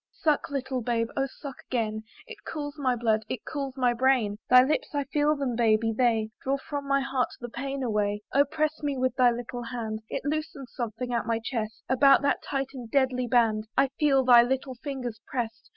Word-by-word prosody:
Suck, 305 -3 +2
little 265 -2 -2
babe, 230 -1 0
oh 270 0 0
suck 275 0 -9
again! 220 -3 -1 0.2
It 455 -3 -11
cools 290 -2 -5
my 255 -3 +1
blood; 220 -2 +1
it 240 - -5
cools 275 -3 -4
my 250 -2 +3
brain; 240 -4 +2
Thy 250 0 +8
lips 310 - -1
I 285 - +1
feel 295 +2 +1
them, 270 -4 -2
baby! 225 -1 +2
they 225 -3 +1
Draw 270 +1 0
from 285 0 -6
my 275 0 +2
heart 265 -2 0
the 240 - -6
pain 275 +2 -4
away. 210 -3 -1
Oh! 280 +1 +5
press 310 +1 -1
me 285 -2 -1
with 255 -1 0
thy 250 -2 +5
little 240 +1 -4
hand; 230 -2 -4
It - - -3
loosens 295 -3 -4
something 240 +1 -4
at 235 -1 -1
my 230 -1 +1
chest; 225 -1 -4
About 275 +2 +5
that 280 - +1
tight 275 -1 -3
and 245 -4 -8
deadly 255 -1 +1
band 220 -3 +2
I 275 0 +4
feel 275 -3 +4
thy 245 -2 +8
little 260 +2 -1
fingers 250 -4 -5
press'd. 235 -2 -4
255 Hz, 200 wpm, -27 LUFS, 230-275 Hz, 0.2 s, Thy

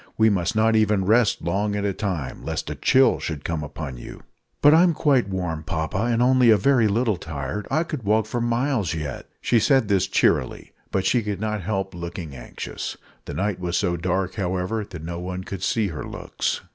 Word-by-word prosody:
We 110 0 +5
must 95 +3 0
not 110 +1 +3
even 105 -3 +2
rest 110 +2 +3
long 100 +5 0
at 100 0 -1
a 100 - 0
time, 90 - -4
lest - - -3
a - - -4
chill 130 0 +4
should 75 -3 -4
come 80 -2 -2
upon 75 -3 -6
you." - - -10 0.4
"But 145 - +7
I'm 170 0 +5
quite 135 -10 +2
warm, 90 -4 -3
papa, 80 +6 -2
and 120 0 +2
only 130 -1 +5
a 110 - +7
very 120 +1 +3
little 110 -1 +1
tired. 75 +7 -5
I 160 - +2
could 155 -5 -5
walk 110 0 +2
for 120 +2 -3
miles 120 - 0
yet." 75 -5 -5
She 120 - +3
said 130 -2 +3
this 95 -1 +2
cheerily, 100 - +1 0.2
but 95 -1 -1
she 120 - +3
could 105 -3 -3
not 105 -1 -2
help 95 0 -2
looking 85 -3 -6
anxious. - - -6 0.3
The - - -6
night 100 0 -1
was 90 -1 -1
so 90 -3 +1
dark, 90 +2 -1
however, 95 +3 -2
that 90 -5 -9
no 85 +1 -5
one 90 +1 -5
could 95 -1 -6
see 105 +1 +1
her 80 - -6
looks. - - -3
100 Hz, 205 wpm, -23 LUFS, 85-115 Hz, 0.4 s, But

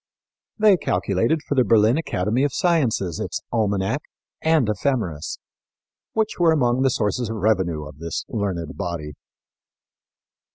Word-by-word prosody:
They 210 -3 +5
calculated 105 - 0
for - - -2
the 130 -2 +4
Berlin 110 +1 +4
Academy 120 - 0
of 145 - +1
Sciences 125 - +1
its - - -3
Almanac 105 +3 0 0.4
and 160 -7 +3
Ephemeris, 105 - -1 0.8
which 220 -3 -1
were 170 -2 +5
among 125 -5 +2
the 135 - +4
sources 115 0 -1
of 115 - -3
revenue 95 -8 0
of 70 +1 -12
this 85 0 -4
learned 95 -7 -3
body. 85 -6 -4
110 Hz, 130 wpm, -23 LUFS, 95-140 Hz, 0.8 s, They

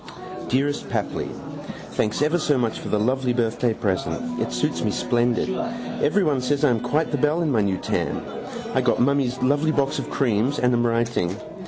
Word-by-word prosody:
Dearest 140 +3 0
Papli - - -2 0.6
Thanks 110 +6 0
ever 155 +4 +2
so 150 -3 +2
much 115 -3 0
for - - -6
the 105 - +1
lovely 130 +3 +1
birthday 120 0 +1
present. 110 - -2
It - - -1
suits 150 0 -1
me 110 - +1
splendid. 120 +2 +1 0.5
Everyone 150 -5 +2
says 140 +3 0
I 145 - +5
am 115 - +1
quite 145 +7 0
the 145 - +1
belle 150 +5 +2
in 155 - +1
my 115 -4 +3
new 100 -2 +1
tam. - - -2 0.5
I - - +3
got - - +2
mummy's 130 -1 +2
lovely 145 +4 +2
box 140 -1 +1
of - - -5
creams 125 +2 +1
and 125 0 +2
am 120 0 +2
writing. 115 -6 0
125 Hz, 185 wpm, -23 LUFS, 115-145 Hz, 0.6 s, I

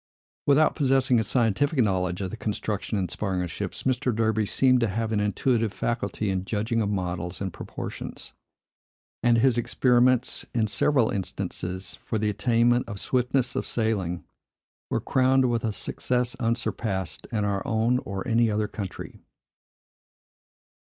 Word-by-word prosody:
Without 145 +2 +4
possessing 130 -3 +3
a - - +1
scientific 125 +7 +1
knowledge 95 -5 +1
of 95 - -3
the - - -4
construction 105 -1 -3
and 95 -2 0
the - - -8
sparring 95 -3 -1
of 85 - -5
ships, - - -5
Mr. 130 -1 +1
Derby 110 -1 +1
seemed 130 +2 +3
to 115 - +2
have 110 +2 -2
an 105 - +1
intuitive 110 +2 +1
faculty 105 -3 -2
in 95 -1 -1
judging 110 +3 -1
of 105 - 0
models 90 -2 -3
and 95 -3 -3
proportions; - - -7 0.9
and 120 -1 +4
his 120 0 +3
experiments, 125 +1 +2
in 115 -2 +3
several 120 +3 +2
instances, 95 -1 -4
for 110 - -2
the 105 0 +1
attainment 120 +3 +2
of 100 - -5
swiftness 125 +2 0
of - - -2
sailing, 100 -7 -1 0.7
were - - 0
crowned 130 0 +3
with 115 -1 0
a 110 - 0
success 125 +3 -1
unsurpassed 115 -5 -2
in 105 -3 0
our 100 -1 0
own 115 +2 +2
or 100 -1 -5
any 115 -1 +3
other 105 0 0
country. 100 -4 -7
110 Hz, 155 wpm, -26 LUFS, 100-125 Hz, 0.9 s, Without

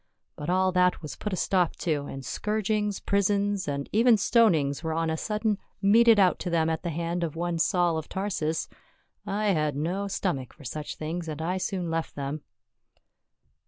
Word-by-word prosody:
But 150 +2 -5
all 185 +1 +3
that 180 -1 +2
was 150 - -6
put 210 - -4
a - - 0
stop 180 -1 +1
to, 145 -4 -2
and 135 -1 -7
scourgings, 210 -1 -1
prisons, 200 0 +1
and 140 -1 -2
even 230 +2 +5
stonings 175 - +3
were 160 -1 -2
on 165 0 0
a - - 0
sudden 210 +3 -1 0.2
meted 220 +2 +6
out 185 -2 +4
to 180 - -3
them 165 -1 +2
at 160 - -2
the 175 - -3
hand 170 +2 -2
of 165 -2 -3
one 170 0 -2
Saul 175 -1 +2
of 155 - -9
Tarsus. 180 -5 -2 0.6
I 210 +1 0
had 150 -5 0
no 180 +7 -2
stomach 175 -9 -2
for 150 - -16
such 150 +4 -5
things, 165 +2 -4
and 155 -1 -5
I 180 +4 -1
soon 180 -3 -2
left 165 0 -2
them." 145 +2 -4
175 Hz, 185 wpm, -27 LUFS, 160-200 Hz, 0.6 s, meted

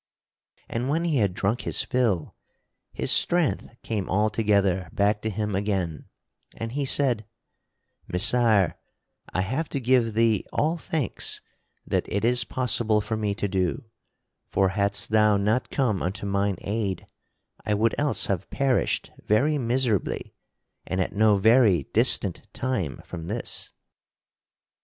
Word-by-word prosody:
And 120 +3 -3
when 160 +4 0
he 165 -4 +1
had 100 -6 +1
drunk 105 +6 -1
his - - 0
fill, 110 -11 -1 0.6
his - - 0
strength 175 -4 +2
came 105 -4 -3
altogether 100 -3 +1
back 105 +1 +1
to 110 - -2
him 105 0 -3
again, 95 -5 -2 0.5
and 115 0 -5
he 140 +2 -2
said: 125 -6 +2 0.8
"Messire, 110 -1 +3 0.5
I 95 - 0
have 130 - -2
to 140 - -2
give 120 -3 +2
thee 115 -2 +2
all 160 +3 0
thanks 155 - -2 0.4
that - - -2
it 100 +2 0
is 125 0 +4
possible 115 -3 +2
for 105 +1 -3
me 105 -2 -2
to 105 - -2
do, 95 +3 -2 0.6
for 95 -1 +1
hadst 100 +2 0
thou 105 -1 +4
not 105 +5 0
come 115 -8 0
unto 95 +3 -3
mine 100 -1 0
aid, 100 -3 -3 0.6
I 105 -1 0
would 110 +2 +1
else 145 -1 +1
have 95 -1 -3
perished 135 -3 0
very 145 +8 +2
miserably 120 -4 -1 0.5
and 95 - -3
at 90 - -1
no 105 0 +4
very 110 - +4
distant - - +2
time 110 - -3
from 85 -2 -8
this." 110 +5 -3
110 Hz, 140 wpm, -25 LUFS, 100-125 Hz, 0.8 s, is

